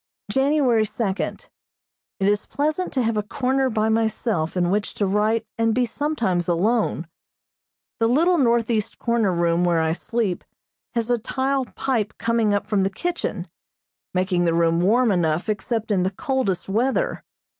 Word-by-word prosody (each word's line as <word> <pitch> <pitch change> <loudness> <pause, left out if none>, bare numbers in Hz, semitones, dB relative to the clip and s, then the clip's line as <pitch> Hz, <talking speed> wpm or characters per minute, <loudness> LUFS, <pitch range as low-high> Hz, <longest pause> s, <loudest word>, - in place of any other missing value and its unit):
January 270 -4 +3
second: 205 -2 -3 0.7
It 195 - +1
is 205 +1 +1
pleasant 310 +6 -1
to 260 - +1
have 225 -1 0
a - - +2
corner 260 +5 0
by 220 -2 0
myself 220 -6 0
in 175 0 +1
which 205 +1 -1
to 205 - 0
write 215 +3 +1
and 225 -1 +2
be 250 0 +2
sometimes 230 - -1
alone. 185 +1 +1 0.9
The 225 - +3
little 335 +8 +3
northeast 235 -4 +1
corner 235 -4 +1
room 170 0 +1
where 175 -2 +2
I 160 0 +1
sleep 210 0 -2 0.5
has 235 0 0
a 240 - +2
tile 265 +3 -1
pipe 235 -5 -2
coming 230 -2 +1
up 205 0 0
from 210 -2 +1
the 190 - +1
kitchen, 350 - -3 0.6
making 180 -1 +1
the 165 -1 +2
room 165 0 +2
warm 230 +5 +3
enough 170 -1 0
except 220 +1 -2
in 195 -3 +2
the 185 - +1
coldest 205 -2 -2
weather. 260 - 0
220 Hz, 155 wpm, -23 LUFS, 190-245 Hz, 0.9 s, January